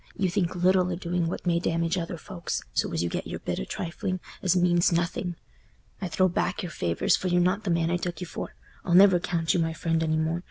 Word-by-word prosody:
You 190 -4 +1
think 180 -2 0
little 185 +1 +3
o' - - -1
doing 175 -1 -1
what 170 - -4
may 170 -1 +2
damage 165 0 0
other 170 -1 -3
folks, 175 0 -4
so - - 0
as 80 - -1
you - - 0
get - - -4
your - - -4
bit - - -3
o' 60 - -3
trifling, 185 - -3 0.2
as 185 -1 +2
means 175 -1 +3
nothing. 175 +1 -1 0.7
I 190 - -1
throw 185 +2 +2
back 180 +1 -1
your 175 - -5
favours, 85 - +1
for 185 - -3
you're 175 0 +3
not 185 +4 +1
the - - -1
man 170 -1 +1
I 175 - +2
took 175 -2 -4
you 180 - -4
for. - - -7 0.3
I'll 175 - +1
never 190 -1 +7
count 170 -2 0
you 180 - +1
my 165 -1 0
friend 165 0 0
any 160 -1 +1
more. 160 +2 0
175 Hz, 245 wpm, -27 LUFS, 165-180 Hz, 0.7 s, never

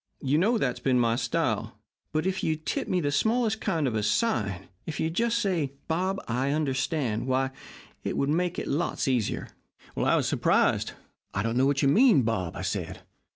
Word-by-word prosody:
You 140 +3 +2
know 225 +7 +3
that's 125 - -1
been 130 -2 +2
my 115 -1 +2
style. 120 -1 -1 0.3
But 155 +2 0
if 190 0 -1
you'd 155 0 -1
tip - - -1
me 180 - +1
the 145 -2 0
smallest 220 +8 +1
kind 165 -8 0
of 120 - -1
a 110 - 0
sign 105 - 0 0.2
if 155 -3 -4
you'd 160 0 0
just 235 +4 +1
say, 175 - 0
"Bob 185 +4 0
I 125 +4 0
understand," 135 -5 -1
why, 130 0 +1 0.5
it - - -2
would 140 - +1
make 175 +3 0
it - - -3
lots 155 +1 -1
easier.' 125 -5 0 0.5
"I - - +2
was - - +1
surprised. - - +2 0.4
'I 95 - 0
don't 115 +1 -1
know 130 +2 +4
what 140 0 +1
you - - +4
mean, 205 - +5
Bob,' 95 -7 -1
I - - -5
said. - - -4
145 Hz, 195 wpm, -27 LUFS, 125-180 Hz, 0.5 s, mean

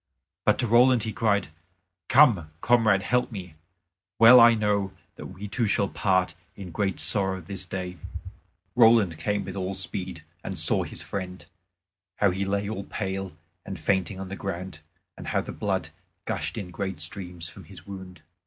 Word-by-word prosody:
But - - +4
to - - 0
Roland 120 +1 +5
he 110 -1 -3
cried, 100 -5 +1 0.6
"Come, 115 - +5
comrade, 110 -5 +3
help 125 +3 0
me; 90 -6 -8 0.6
well 115 +2 +9
I 115 0 +8
know 100 -3 0 0.2
that - - -8
we 95 +2 -8
two 115 +2 0
shall 100 -1 +1
part 95 -2 +1 0.2
in 95 -3 -9
great 95 +2 -1
sorrow 95 -2 +3
this 95 +1 -6
day." 90 -1 -5 0.8
Roland 110 -8 +5
came 100 +4 -1
with 95 0 -7
all 95 0 -3
speed, 90 -2 -3 0.2
and - - -5
saw - - +3
his - - -6
friend, 95 -2 -6 0.7
how 100 -2 +2
he 95 +2 -2
lay 100 +1 -1
all 100 -2 -5
pale 95 -2 -4 0.3
and 95 - -7
fainting 95 0 0
on 95 -1 -6
the 100 - -5
ground 95 -1 -6 0.4
and - - -9
how - - 0
the - - -7
blood 95 -5 -2 0.4
gushed - - -3
in 95 -5 -6
great 95 -2 -4
streams 85 +1 -4
from - - -13
his - - -13
wound. 95 -2 -10
95 Hz, 170 wpm, -26 LUFS, 95-105 Hz, 0.8 s, well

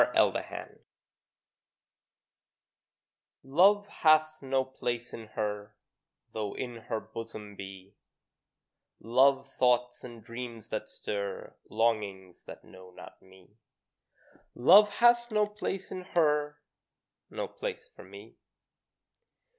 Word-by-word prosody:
NEVER - - +3
(Song) - - -9 2.6
Love 190 +10 +4
hath 155 -3 +3
no 135 -1 0
place 120 -2 -4
in 110 -1 -8
her, 105 -1 -3 0.6
Though 105 -2 -4
in 120 -2 -5
her 110 -2 -1
bosom 110 -2 -9
be 95 0 -10 1.1
Love 135 +4 +3
thoughts 125 -2 +1
and 120 -3 -10
dreams 115 -1 -8
that 110 0 -4
stir 100 -2 -5
Longings 100 -5 -1
that - - -11
know 95 -1 -14
not 90 - -14
me: 95 +3 -21 1.0
Love 205 +12 +7
hath 240 0 +4
no 210 -1 +3
place 205 -2 -5
in 185 - -5
her, 150 -4 +1 0.7
No - - -4
place 480 -2 -6
for - - -12
me. - - -14
120 Hz, 105 wpm, -29 LUFS, 105-155 Hz, 2.6 s, Love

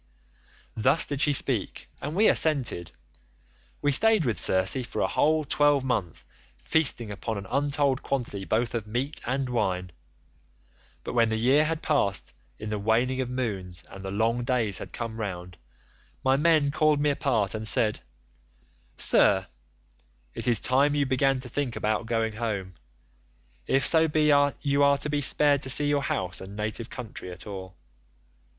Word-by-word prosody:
"Thus 130 +8 +2
did 145 -1 -4
she 150 - +3
speak 130 -6 0
and 150 - -5
we 215 +3 +4
assented. 130 - +1 0.9
We 145 - +2
stayed 215 +3 +4
with 115 -4 +1
Circe 95 +8 +2
for 120 - -6
a - - +1
whole 155 0 +1
twelvemonth 135 - 0 0.3
feasting 130 -8 0
upon 110 +2 -5
an 100 - -7
untold 140 +1 0
quantity 120 -7 -4
both 115 +4 -1
of 115 -3 -4
meat 130 +7 -3
and 135 +1 -1
wine. 90 -7 -2 1.1
But - - -6
when 115 -2 +2
the 110 - -1
year 135 +7 +3
had 160 +1 -3
passed 100 -10 0 0.2
in 110 - -7
the 105 -1 -3
waning 120 +5 0
of 125 - -4
moons 100 -9 -3
and 95 0 -10
the 95 - -5
long 115 +4 0
days 120 -6 -1
had - - -9
come 115 -1 -6
round, 90 -4 -6 0.6
my 130 0 +3
men 150 -1 +2
called 155 0 +2
me 145 0 +2
apart 115 -8 -1
and 110 0 -3
said, 105 0 +1 1.0
'Sir, 95 -1 +4 0.9
it - - -5
is 120 -3 +4
time 140 +3 +2
you 145 -1 +1
began 135 +1 +1
to 130 - -7
think 130 0 -3
about 110 +1 -2
going 115 -1 -1
home, 105 -4 -4 0.9
if 135 0 +2
so 160 -1 +5
be 150 -1 +2 0.3
you 140 0 +1
are 140 0 +4
to 150 - -4
be 145 -1 0
spared 145 0 +4
to 130 - -2
see 145 +2 +5
your 145 -1 +1
house 90 -9 -2
and 95 +2 -10
native 110 +2 -4
country 110 -6 -8
at 90 - -10
all. 95 -2 -8
125 Hz, 165 wpm, -26 LUFS, 105-145 Hz, 1.1 s, so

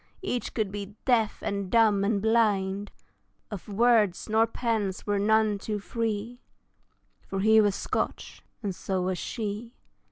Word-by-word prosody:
Each 250 -11 -2
could 215 -4 -1
be 205 0 -6
deaf, 230 -5 +2
and 200 -2 -2
dumb, 215 -3 +4
and 200 0 0
blind; 205 -3 +1 0.6
Of 200 -4 -7
words 215 -3 +3
nor 220 +1 +3
pence 220 -5 -2
were 205 -1 0
none 215 0 +3
too 210 +1 -3
free 225 +2 -3 0.9
For 195 0 -2
he 220 +1 +6
was 205 -2 +2
Scotch, - - -3 0.2
and 200 -2 -2
so 185 0 -2
was 185 0 -1
she. 225 +1 -5
210 Hz, 140 wpm, -27 LUFS, 200-225 Hz, 0.9 s, he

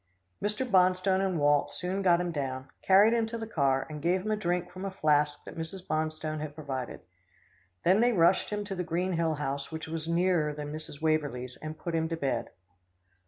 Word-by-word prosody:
Mr. 210 +5 -1
Bonstone 185 -1 +3
and 190 -3 0
Walt 145 -1 +3
soon 185 +2 -2
got 175 -3 +4
him 175 -1 -1
down, 130 -3 -3
carried 200 +4 +6
him 230 -1 +2
to 230 +1 -4
the 225 - -4
car, 140 -10 +1
and 150 -1 -7
gave 180 +4 +2
him 215 - 0
a - - +3
drink 180 -3 -1
from 185 +1 -8
a 195 - -1
flask 150 -5 +1
that - - -9
Mrs. 165 +3 -6
Bonstone 155 0 -2
had 150 -1 -6
provided. 135 -5 -5 0.8
Then 190 +5 +4
they 245 +1 +4
rushed 175 -3 +3
him 210 -1 -3
to 200 - -4
the 180 -1 -2
Green 180 +2 -1
Hill 165 -2 +1
house 140 0 -3
which 160 0 -5
was 160 0 -4
nearer 170 -3 +2
than 145 0 -5
Mrs. 155 -1 -6
Waverlee's, 145 -6 0
and 155 0 -7
put 170 - -5
him 160 0 0
to 165 - -2
bed. 135 -6 -1
165 Hz, 210 wpm, -29 LUFS, 150-185 Hz, 0.8 s, carried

